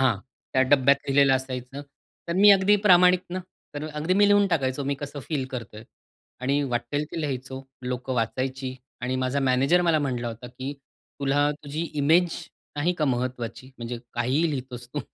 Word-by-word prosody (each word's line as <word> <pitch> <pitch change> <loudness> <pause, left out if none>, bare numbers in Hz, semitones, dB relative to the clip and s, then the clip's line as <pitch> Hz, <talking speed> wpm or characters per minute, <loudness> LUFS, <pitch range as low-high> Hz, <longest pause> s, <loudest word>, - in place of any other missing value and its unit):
हां, 130 -6 +3 0.4
त्या 130 - +4
डब्यात 140 0 +5
लिहिलेलं 135 0 +4
असायचं. 130 +1 -4 0.5
तर - - 0
मी 205 +2 +8
अगदी 200 +1 +5
प्रामाणिक 180 -1 +6
ना, 185 - -2 0.4
तर 145 +1 -4
अगदी 155 +4 -1
मी 205 +1 +5
लिहून 205 0 +5
टाकायचो, 135 -4 0
मी 140 - 0
कसं 145 0 -6
फील 145 -5 -1
करतोय 110 -3 -7 0.6
आणि 140 +3 +1
वाटेल 120 +5 -1
ते 165 - -4
लिहायचो. 130 -2 -4 0.2
लोकं 125 +1 -3
वाचायची 130 +2 -2 0.3
आणि 125 +1 -2
माझा 130 +2 0
मॅनेजर 135 +6 +3
मला 165 -3 +3
म्हटला 125 -4 -2
होता, 115 +2 -8
कि 130 +3 -6 0.5
तुला 145 +1 +2
तुझी 150 +2 -4 0.2
इमेज 170 +3 +4 0.4
नाही 160 +5 +1
का 155 - +2
महत्वाची? 125 -2 -3
म्हणजे 120 0 -5 0.2
काहीही 130 +8 +1
लिहितोस 125 -3 -5
तू. 145 - -1
135 Hz, 165 wpm, -25 LUFS, 125-150 Hz, 0.6 s, मी